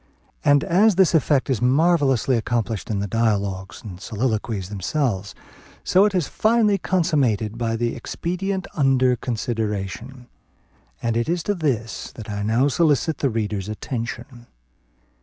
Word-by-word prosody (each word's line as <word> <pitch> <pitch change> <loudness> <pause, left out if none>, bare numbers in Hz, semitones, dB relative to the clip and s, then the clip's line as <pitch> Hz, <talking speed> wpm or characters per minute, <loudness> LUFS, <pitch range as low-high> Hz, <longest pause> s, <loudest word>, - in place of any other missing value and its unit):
And, 145 -1 +4
as 200 +4 +4
this 190 -2 +4
effect 145 -3 +2
is 130 -5 0
marvellously 135 -2 +3
accomplished 115 -1 -2
in 105 - -1
the 100 - -2
dialogues 100 -2 -1
and 95 -4 -9
soliloquies 110 -4 -2
themselves, 100 - -2 0.5
so 190 +2 +4
it 205 -2 0
is 175 -6 +1
finally 215 -3 +2
consummated 130 - +1
by 115 -1 -1
the 120 +1 -1
expedient 190 +2 -3
under 130 -3 +3
consideration; 115 0 -4 0.8
and 115 -1 0
it 120 +5 0
is 170 -1 0
to 205 - 0
this 130 - -2
that 110 -2 -8
I 105 0 -3
now 115 +6 +2
solicit 155 0 +1
the 140 - +1
reader's 105 -3 -2
attention. 120 +2 -6
120 Hz, 140 wpm, -22 LUFS, 110-155 Hz, 0.8 s, And